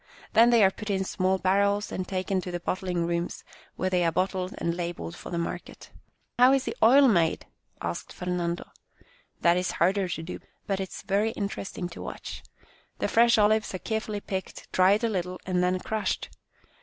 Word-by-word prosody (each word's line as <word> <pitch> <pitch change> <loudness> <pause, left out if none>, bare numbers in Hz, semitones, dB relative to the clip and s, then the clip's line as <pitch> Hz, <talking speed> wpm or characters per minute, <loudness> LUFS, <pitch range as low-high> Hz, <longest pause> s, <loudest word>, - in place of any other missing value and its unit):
Then 230 +2 +7
they 235 -3 +5
are 190 - +6
put 215 +2 -8
in 190 -1 +1
small 185 0 +1
barrels 200 +3 +1
and 185 -1 -3
taken 190 0 -1
to 180 - -6
the 175 0 -3
bottling 180 -1 -2
rooms, 170 0 -2 0.3
where 185 - -1
they 180 -1 +2
are 165 - +2
bottled 185 +1 -1
and 170 0 -1
labelled 170 - -4
for - - -9
the 170 - -3
market." 170 - -5 0.2
" - - -26
How 255 +2 +7
is 270 -1 +2
the - - -4
oil 270 +5 +7
made? 170 -8 +2 0.2
" - - -38
asked 85 0 -4
Fernando. 175 -1 -3 0.3
" - - -34
That 170 +1 +5
is 180 0 -1
harder 195 0 +2
to 165 -2 -4
do, 170 - -6 0.3
but 195 -1 -1
it 190 -1 -3
is - - -9
very 210 +3 +1
interesting 195 -2 -4
to 170 - -9
watch. - - -7 0.6
The - - 0
fresh 235 0 +5
olives 215 -1 +3
are - - -1
carefully 215 0 -3
picked, 190 -2 -6
dried 195 +4 +4
a - - +3
little, 185 -4 -3
and 180 -1 +1
then 180 +1 +2
crushed. 215 +2 -2
185 Hz, 200 wpm, -27 LUFS, 180-210 Hz, 0.6 s, Then